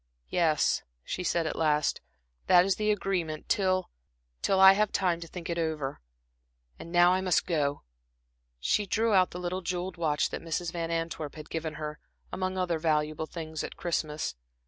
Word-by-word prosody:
"Yes," 160 -4 +2 0.2
she 180 - -4
said 170 -2 +1
at 155 - -2
last, 150 -2 +1 0.5
"that 180 0 +7
is 195 -1 +1
the 215 0 0
agreement, 185 -6 -1
till 185 -3 +1 0.5
till 195 - +2
I 190 0 +10
have 210 +1 +1
time 180 -3 +1
to 170 - -8
think 170 0 -7
it 170 0 -2
over. 155 -4 -2 0.8
And 170 - -9
now 175 +1 +6
I 185 - +1
must 185 -2 +2
go." 145 -4 0 0.8
She 205 - +1
drew 225 +3 +1
out 185 -2 +5
the 180 - -7
little 180 +1 -3
jeweled 180 0 -3
watch 155 -3 +1
that - - -4
Mrs. 165 +1 -2
Van 165 -1 -3
Antwerp 165 -3 -3
had 155 -1 -10
given 160 -2 -3
her, 150 -1 -5 0.3
among 185 0 -2
other 175 -3 0
valuable 155 -1 0
things, 160 -2 -5
at - - -7
Christmas. 155 -3 -2
170 Hz, 175 wpm, -29 LUFS, 155-185 Hz, 0.8 s, I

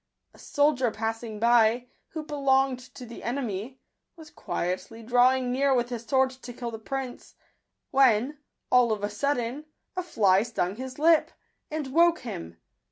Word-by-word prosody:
A - - -19
soldier 285 -4 +2
passing 225 0 -4
by, 235 +1 +4 0.2
who 315 -1 -6
belonged 270 -3 +1 0.2
to 250 - -8
the 235 0 -10
enemy, 240 -1 -4 0.4
was 320 -3 -13
quietly 185 +6 -4
drawing 250 +2 +3
near 270 +1 +2
with 240 -1 0
his 240 -2 -5
sword 265 +2 +2
to 255 -1 -10
kill 240 0 -5
the 225 - -7
prince, 265 +2 -6 0.6
when, 265 +1 +3 0.3
all 250 -2 +5
of 210 -2 -2
a 205 - -1
sudden, 260 +4 -2 0.3
a 365 - -1
fly 200 - +3
stung 210 -4 -2
his 260 0 -7
lip, 320 +1 +4 0.4
and 310 -1 -3
woke 340 +1 +4
him. 85 - -7
250 Hz, 155 wpm, -27 LUFS, 225-275 Hz, 0.6 s, all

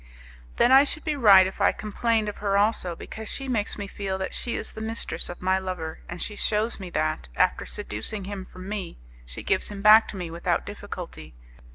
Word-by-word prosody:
"Then 245 - +4
I 270 +1 +9
should 300 +1 -3
be 305 -2 -1
right 200 -8 +8
if 190 +2 -5
I 200 - +5
complained 220 +1 -1
of 210 - -4
her 200 -1 +1
also, 200 -4 +1
because 220 +5 -8
she 270 - -4
makes 225 -5 -1
me 205 - -4
feel 195 -1 -4
that 190 - -4
she 240 - -3
is - - -2
the 220 - -8
mistress 225 +1 -3
of 175 - -8
my 190 +1 +2
lover, 180 -4 -5
and 175 - -6
she 210 - -2
shews 215 +2 0
me 185 -2 -7
that, 75 - -1
after - - +1
seducing 110 - -4
him 195 0 -5
from 185 0 -11
me, 200 -4 -5 0.3
she - - -7
gives 190 - +2
him 200 -1 -7
back 215 +1 +8
to 200 - -7
me 175 -3 -5
without 170 +1 -1
difficulty. 180 - -8
200 Hz, 215 wpm, -26 LUFS, 185-215 Hz, 0.3 s, I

